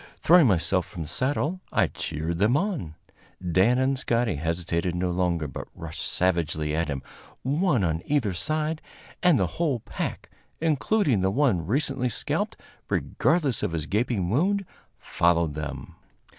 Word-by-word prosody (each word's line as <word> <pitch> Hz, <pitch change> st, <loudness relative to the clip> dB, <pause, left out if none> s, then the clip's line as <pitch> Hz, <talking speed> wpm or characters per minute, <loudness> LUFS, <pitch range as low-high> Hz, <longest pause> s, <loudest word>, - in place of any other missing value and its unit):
Throwing 170 Hz, -4 st, +6 dB
myself 90 Hz, -1 st, +2 dB
from 85 Hz, -5 st, -6 dB
the -, -, -8 dB
saddle, 145 Hz, -, -1 dB
I -, -, +3 dB
cheered 80 Hz, +2 st, -3 dB
them 110 Hz, +7 st, +4 dB
on. 155 Hz, -, -2 dB, 0.4 s
Dan 95 Hz, +7 st, +3 dB
and 130 Hz, +1 st, +1 dB
Scotty 115 Hz, -, +1 dB
hesitated 85 Hz, +2 st, -1 dB
no 90 Hz, 0 st, 0 dB
longer, 85 Hz, -3 st, 0 dB
but 70 Hz, -, -7 dB
rushed 80 Hz, -1 st, -7 dB
savagely 80 Hz, -4 st, 0 dB
at 85 Hz, +1 st, 0 dB
him, 70 Hz, -3 st, -4 dB, 0.4 s
one 145 Hz, -, +2 dB
on 80 Hz, -1 st, 0 dB
either 130 Hz, -10 st, +1 dB
side, 155 Hz, -, -1 dB, 0.4 s
and 180 Hz, -5 st, +5 dB
the 95 Hz, -, +2 dB, 0.2 s
whole 145 Hz, -8 st, +1 dB
pack, -, -, -5 dB, 0.3 s
including 155 Hz, -, +2 dB
the 95 Hz, -, +2 dB
one 100 Hz, -, +1 dB
recently 135 Hz, +1 st, 0 dB
scalped, -, -, -2 dB, 0.3 s
regardless 150 Hz, -8 st, +1 dB
of -, -, -1 dB
his 80 Hz, -2 st, -2 dB
gaping 105 Hz, -1 st, 0 dB
wound, 195 Hz, -, +2 dB, 0.3 s
followed 85 Hz, -2 st, +1 dB
them. 75 Hz, -2 st, -6 dB
100 Hz, 145 wpm, -26 LUFS, -, 0.4 s, Throwing